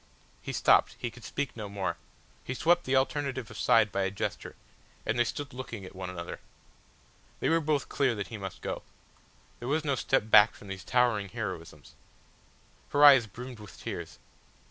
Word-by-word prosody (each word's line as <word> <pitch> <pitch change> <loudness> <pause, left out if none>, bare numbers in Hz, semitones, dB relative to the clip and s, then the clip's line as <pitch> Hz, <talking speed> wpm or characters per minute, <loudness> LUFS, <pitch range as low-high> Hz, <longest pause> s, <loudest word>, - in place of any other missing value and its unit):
He - - -5
stopped, - - +4
he 120 - -4
could 125 0 -14
speak 140 +5 -3
no 105 -3 -6
more, 100 -1 -2 0.5
he 130 - -4
swept 175 +5 +3
the 130 - +1
alternative 130 -3 0
aside 105 +2 +3
by 100 - -1
a 95 - +1
gesture, 100 - -4 0.5
and 110 +3 0
they - - +6
stood 140 +4 -5
looking 120 -6 -7
at 95 - -11
one 95 -1 -5
another. 85 -1 -6 1.0
They - - +1
were 165 +1 +3
both 150 -2 0
clear 130 -4 +1
that 100 -3 -4
he 115 - -6
must 95 -2 -7
go. - - -3 0.8
There 120 - -6
was 155 +2 0
no 140 - +1
step 125 -3 0
back 105 -1 +7
from 100 - -13
these 95 -2 -6
towering 115 -4 +2
heroisms. - - -6 1.0
Her 145 +1 +5
eyes 135 -5 +8
brimmed 125 +3 -9
with 105 -1 -12
tears. - - -6
115 Hz, 180 wpm, -29 LUFS, 100-135 Hz, 1.0 s, eyes